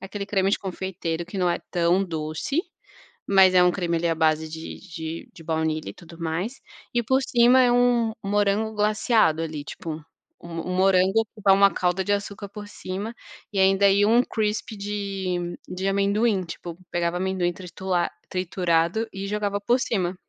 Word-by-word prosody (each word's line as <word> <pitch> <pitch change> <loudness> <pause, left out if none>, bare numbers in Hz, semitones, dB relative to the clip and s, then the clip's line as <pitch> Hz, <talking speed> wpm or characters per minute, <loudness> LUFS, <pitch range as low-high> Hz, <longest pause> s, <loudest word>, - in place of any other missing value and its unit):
aquele 200 +1 -5
creme 195 -1 +1
de - - +1
confeiteiro 180 -3 -4
que 190 - -8
não 180 -2 +2
é - - 0
tão 175 +2 +2
doce, 160 - -2 0.7
mas 190 -2 +6
é 180 - +7
um 180 - +5
creme 170 -3 -1
ali 170 +1 0
à 165 - +2
base 160 0 +2
de 160 +1 -8
de 165 -3 -7
de 165 - -13
baunilha 160 -1 -1
e - - -8
tudo 170 -1 -14
mais 170 +10 -3 0.3
e 240 - +2
por 260 +4 +2
cima 245 +2 +5
é 245 -1 +4
um 245 -2 +3
um 195 - -4
morango 205 +2 +1
glaceado 210 -5 +2
ali, 155 -3 -4
tipo, 155 +1 -6 0.5
um 170 - -10 0.2
um - - -1
morango 190 +3 +3
que 215 - -14
dá 195 - +6
uma 200 0 +5
calda 180 +1 0
de 205 - -1
açúcar 200 0 -4
por 205 0 -9
cima 205 +4 -6 0.4
e 200 - -5
ainda, 195 +1 +5
ia 200 +1 +4
um 235 +2 +5
crispy 215 -1 -2
de 195 -4 -3
de 190 +2 -3
amendoim, 200 +1 +2
tipo, 170 0 -8
pegava 175 0 0
amendoim 185 -1 0
tritura 180 0 -2 0.2
triturado 180 +3 0
e 195 0 -5
jogava 205 -1 -1
por 240 +5 +2
cima. 185 -7 -1
190 Hz, 180 wpm, -24 LUFS, 170-205 Hz, 0.7 s, é